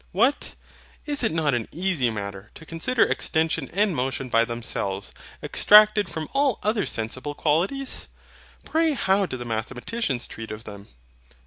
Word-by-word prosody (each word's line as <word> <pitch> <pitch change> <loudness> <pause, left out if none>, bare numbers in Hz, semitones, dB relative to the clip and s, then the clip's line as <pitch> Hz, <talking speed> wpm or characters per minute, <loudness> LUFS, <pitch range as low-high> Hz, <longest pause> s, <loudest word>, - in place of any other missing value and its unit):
What! 240 +10 +1 0.5
is 290 -1 +2
it 225 - +2
not 155 -3 +1
an 120 -3 -1
easy 170 -7 +1
matter 100 -1 -6
to 160 - -12
consider 165 +10 +1
extension 160 -3 0
and 200 -1 +1
motion 130 0 -2
by 115 0 +3
themselves, 100 -4 -4 0.3
abstracted 210 0 +6
from 160 -1 -4
all 275 -3 +2
other 215 -1 +1
sensible 130 +6 -4
qualities? 190 - 0 0.6
Pray 320 -1 +1
how 195 -6 +1
do 130 - -5
the 120 - -7
mathematicians 125 - -3
treat 115 0 -8
of 110 +1 -7
them? 100 -2 -10
160 Hz, 145 wpm, -24 LUFS, -, 0.6 s, abstracted